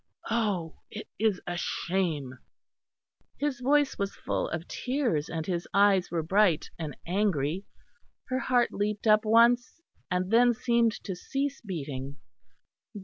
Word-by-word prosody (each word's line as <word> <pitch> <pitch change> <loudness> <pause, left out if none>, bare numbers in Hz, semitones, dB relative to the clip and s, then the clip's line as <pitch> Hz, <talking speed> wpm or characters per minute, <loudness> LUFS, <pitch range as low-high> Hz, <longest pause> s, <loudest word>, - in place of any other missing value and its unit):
Oh! 205 -8 -1
it 215 - -8
is 215 -4 +2
a 175 - -3
shame!" 160 -9 -2 1.0
His 285 -3 -1
voice 285 +2 +2
was 200 0 -2
full - - -2
of 160 +2 -4
tears, 250 - -1
and 160 -1 -3
his 175 -1 -2
eyes 200 -2 +4
were 165 -2 -1
bright 185 -2 +2
and 150 -4 -5
angry. 180 -2 0 0.6
Her 255 0 0
heart 245 -2 +2
leapt 210 +1 -2
up 215 0 +5
once 235 +6 +4 0.3
and 180 +2 -1
then 240 +1 +5
seemed 235 -1 +2
to 190 - -4
cease 275 +9 -3
beating. 145 - -5
200 Hz, 135 wpm, -28 LUFS, 170-235 Hz, 1.0 s, up